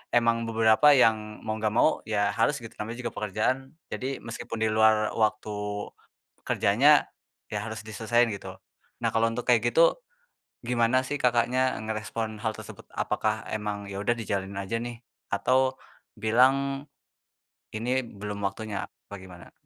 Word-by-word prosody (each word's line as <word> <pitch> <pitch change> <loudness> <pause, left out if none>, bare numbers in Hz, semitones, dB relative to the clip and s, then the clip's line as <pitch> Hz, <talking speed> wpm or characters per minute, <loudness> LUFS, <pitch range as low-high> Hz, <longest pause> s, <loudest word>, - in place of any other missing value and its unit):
emang 115 -1 +2
beberapa 115 +6 +5
yang 110 -3 +2
mau 110 0 -3
gak 110 0 -1
mau 155 - +4
ya 105 -1 +1
harus 145 - +2
gitu 115 - -8
namanya 115 +4 -5
juga - - -2
pekerjaan, 125 +7 -2 0.2
jadi 135 +1 -4
meskipun 115 -1 -5
di 110 - +2
luar 110 0 +4
waktu, 110 -1 0 1.0
kerjanya, 135 +10 +4 0.4
ya 105 - -1
harus 110 -1 -6
diselesain 110 +2 +1
gitu. 100 - -7 0.5
Nah - - +3
kalau 115 0 +2
untuk 115 +1 -3
kayak 120 -1 +3
gitu, 165 - +5 0.7
gimana 125 +2 +2
sih 145 +1 -3
Kakaknya 125 +1 +2
ngerespon 110 0 -4
hal 110 0 -2
tersebut, - - -11
apakah - - -1
emang 105 -1 -3
ya 100 0 -5
udah 120 +3 +1
dijalanin 100 -3 -3
aja 115 +4 -2
nih 120 0 -5 0.3
atau, 130 +1 +2 0.4
bilang, 135 +6 +2 0.9
"ini 125 +4 0
belum 105 -4 -7
waktunya," 105 -1 -5
apa - - -15
gimana? 90 -2 -13
115 Hz, 145 wpm, -27 LUFS, 105-125 Hz, 1.0 s, beberapa